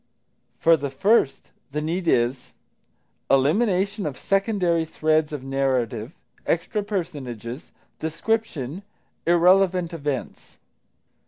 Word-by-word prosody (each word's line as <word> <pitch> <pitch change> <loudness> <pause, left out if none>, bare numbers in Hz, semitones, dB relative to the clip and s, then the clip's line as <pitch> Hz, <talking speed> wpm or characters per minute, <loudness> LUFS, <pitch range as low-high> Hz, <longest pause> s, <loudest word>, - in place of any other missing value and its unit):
For 165 0 +5
the 140 -1 -3
first, 150 - +1 0.2
the 150 - -2
need 170 +4 -2
is 125 -1 +1 0.8
Elimination 190 - +2
of 135 -4 -5
secondary 195 -4 +1
threads 155 -1 +1
of 145 -3 -5
narrative, 130 -2 -1 0.3
extra 180 +5 0
personages, 145 - -5 0.3
description, 165 - -2 0.5
irrelevant 180 0 +4
events. 145 -5 -5
160 Hz, 90 wpm, -24 LUFS, 135-185 Hz, 0.8 s, For